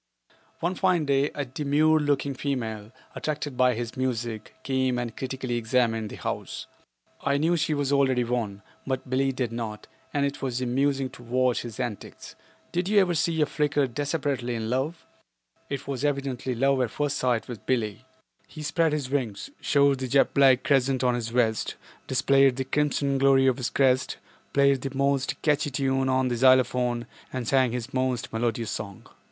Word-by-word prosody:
One 175 +2 0
fine 185 -4 +2
day 140 +1 +2
a 145 - -2
demure 150 +4 +2
looking 145 -1 0
female, 115 -6 -3 0.2
attracted 150 -3 -3
by 125 -1 +3
his 120 0 -5
music, 120 -4 -3
came 130 -2 0
and 120 -2 -4
critically 130 -2 -3
examined 115 -2 +1
the - - -8
house. - - -5 0.6
I 140 0 +1
knew 165 +4 +2
she 155 -1 0
was 145 -1 -1
already 130 -3 +3
won, 115 -4 -3 0.2
but 130 -1 -2
Billie 135 +1 +2
did 125 -3 -2
not, 115 -2 -5 0.3
and 140 -1 +1
it 140 +1 -4
was 125 -3 -2
amusing 135 +1 0
to 125 - -13
watch 125 +1 +1
his 120 -2 -8
antics. 120 -6 -6 0.4
Did 180 +2 -1
you 210 -1 +5
ever 185 -3 +3
see 160 0 +1
a - - +5
Flicker 145 -1 +1
desperately 140 -2 -2
in 110 0 -3
love? 140 +6 -2 0.6
It 140 -1 -4
was 140 -1 -3
evidently 135 -3 -1
love 135 +2 +2
at 125 - 0
first 145 +4 -1
sight 125 -3 0
with 120 -4 -9
Billie. 115 -3 -1 0.4
He 155 - -9
spread 160 +1 +1
his 140 -4 -2
wings, 130 - -2
showed 140 -2 +3
the 130 - -3
jet 135 +2 +3
black 135 -2 +5
crescent 135 -2 +2
on 125 -1 +3
his 120 -2 -2
vest, 115 -2 0 0.3
displayed 135 0 +4
the 135 - -2
crimson 140 -1 0
glory 135 -1 +5
of 130 -1 +3
his 125 -4 -2
crest, 130 0 +2 0.3
played 140 -1 +3
his 135 -1 -4
most 140 0 0
catchy 145 -1 +2
tune 135 0 0
on 130 0 +2
the 120 - -1
xylophone 125 -1 +3 0.3
and 130 -3 -4
sang 130 -2 +3
his 125 +1 -5
most 130 -2 -1
melodious 115 0 -1
song. 100 -2 -6
130 Hz, 175 wpm, -26 LUFS, 120-140 Hz, 0.6 s, you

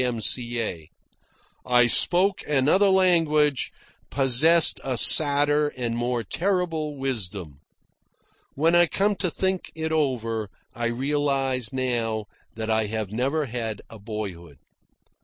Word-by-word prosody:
M.C.A. 115 -7 -2 0.7
I 120 -1 +3
spoke 180 - +3
another 150 +8 +2
language, 165 -7 +2 0.4
possessed 145 +5 +3
a 130 -2 -3
sadder 145 +2 +5
and 120 -2 -3
more 120 0 -2
terrible 165 - -2
wisdom. 100 - -4 1.0
(When 160 +4 +1
I 175 0 +5
come 200 +5 0
to 185 - -2
think 190 +3 -3
it 160 0 -4
over, 115 -8 -2 0.2
I 120 0 -3
realise 135 -1 -1
now 120 -5 -2 0.3
that 110 0 -5
I 110 -1 0
have 110 -2 -5
never 135 +7 -1
had 115 -4 -5
a 110 - -12
boyhood.) 100 -8 -8
130 Hz, 115 wpm, -24 LUFS, 115-155 Hz, 1.0 s, sadder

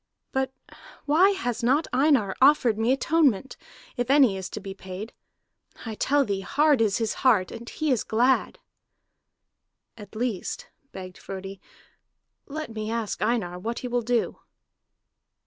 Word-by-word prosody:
But 265 0 -1 0.5
why 325 +7 +5
has 245 - -2
not 270 +7 +2
Einar 260 -7 +3
offered 265 -5 +5
me 225 +3 +1
atonement, 270 -4 +2 0.4
if 245 0 -2
any 270 -7 +5
is 190 -1 -5
to - - -6
be 195 -1 -7
paid? 190 +3 -8 0.7
I 225 - -4
tell 280 +6 +2
thee, 200 -3 -2
hard 290 +5 +2
is 210 -3 +2
his 225 -2 -1
heart, 215 -8 +3
and 235 +1 -8
he 310 -2 -1
is 250 - +1
glad!" 245 +4 +1 1.4
"At 210 -2 -13
least," 245 - -3 0.2
begged 185 -1 -9
Frodi, 195 0 -8 0.9
"let 305 -4 -6
me 215 -1 -4
ask 225 -2 -3
Einar 210 -6 -1
what 230 +5 -4
he - - -1
will 245 0 0
do." 235 0 -1
235 Hz, 145 wpm, -26 LUFS, 205-270 Hz, 1.4 s, why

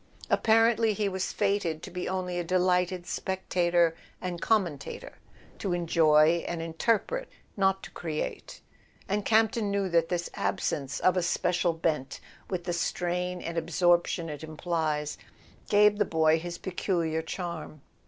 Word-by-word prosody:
Apparently 225 0 +4
he 205 0 0
was 190 0 -2
fated 200 -6 0
to - - -7
be 180 0 -4
only 180 -1 -2
a - - -1
delighted 180 0 +1
spectator 175 -3 +1 0.2
and 180 -2 -4
commentator; 175 -10 -1 0.4
to 190 -3 -1
enjoy 165 -1 +4
and 170 - -3
interpret, 220 - -1 0.3
not 195 -1 +1
to - - -9
create. 155 -3 -5 0.5
And 205 +1 0
Campton 220 0 +2
knew 200 -1 0
that 165 -1 +2
this 175 -1 -2
absence 140 -2 -2
of 185 0 +3
a - - +3
special 175 0 +1
bent, 160 -4 -2 0.3
with 180 -2 -2
the 175 0 -2
strain 180 +1 -2
and 170 0 -2
absorption 175 +1 +2
it 150 -1 -7
implies, 155 -2 -2 0.5
gave 210 0 +5
the - - +5
boy 160 -1 +3
his 175 +1 -6
peculiar 170 -3 -1
charm. 165 -3 -6
175 Hz, 140 wpm, -28 LUFS, 165-190 Hz, 0.5 s, gave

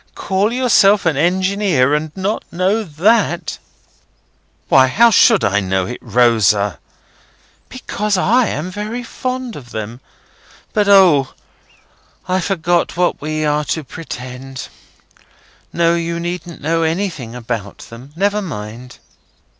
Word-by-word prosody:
Call 195 +3 0
yourself 210 -6 +3
an 160 -3 +2
Engineer, 180 -3 +1
and 150 +1 -1
not 195 +3 -2
know 190 +5 +1
that?" 180 +1 0 1.1
"Why, 130 -1 +5
how 230 - +4
should 225 -1 +5
I 100 +1 +2
know 95 -1 -1
it, 125 - -6
Rosa?" 105 -6 +2 0.9
"Because 210 -5 -2
I 230 +6 +3
am 160 +5 -4
very 215 +5 -5
fond 255 0 -5
of 125 -5 -11
them. 110 +2 -6 0.7
But 210 -2 +1
O! 180 -9 +5 0.9
I 185 +1 +1
forgot 175 -2 0
what 180 0 0
we 155 +1 -2
are 150 0 +1
to 160 - -2
pretend. 130 -2 -8 1.0
No, 170 0 +2
you 170 0 -2
needn't 175 0 -6
know 165 +2 +1
anything 160 - -2
about 115 -4 -5
them; 125 +5 -12
never 205 +3 0
mind." 120 - -8
170 Hz, 125 wpm, -17 LUFS, 130-200 Hz, 1.1 s, Why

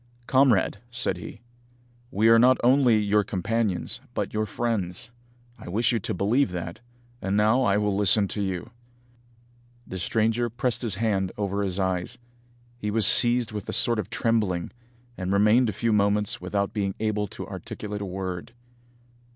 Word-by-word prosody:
"Comrade," 130 -8 +3
said 120 -6 -2
he, 105 +5 -10 0.7
"we 110 +1 +1
are 115 0 +7
not 125 +2 +5
only 125 -2 +4
your 105 0 +2
companions 100 0 -2
but - - -3
your 110 0 -1
friends. 110 -2 -3 0.5
I - - -10
wish 110 +8 +1
you 115 - 0
to - - -4
believe 110 +7 +1
that, 85 +4 -6 0.4
and 95 +1 -1
now 110 +5 +3
I 100 -5 +2
will 105 -1 0
listen 100 0 +3
to 105 - -4
you." 95 +3 -4 1.1
The 95 - -7
stranger 115 +4 0
pressed 120 +1 -2
his 115 -6 -2
hand 95 -3 -1
over 100 -1 -2
his 95 -1 -2
eyes. 95 +5 -2 0.6
He 105 - -3
was 105 -1 +3
seized 120 +1 +6
with 105 -3 -6
a - - -3
sort 120 -2 +2
of - - -4
trembling, 105 -7 -1 0.5
and 90 0 -3
remained 105 +5 +4
a - - -1
few 115 +1 -1
moments 105 -1 +1
without 100 +3 -2
being 100 -3 -2
able 105 -1 -1
to - - -8
articulate 105 -1 -7
a - - -3
word. 95 0 -5
105 Hz, 165 wpm, -25 LUFS, 95-115 Hz, 1.1 s, are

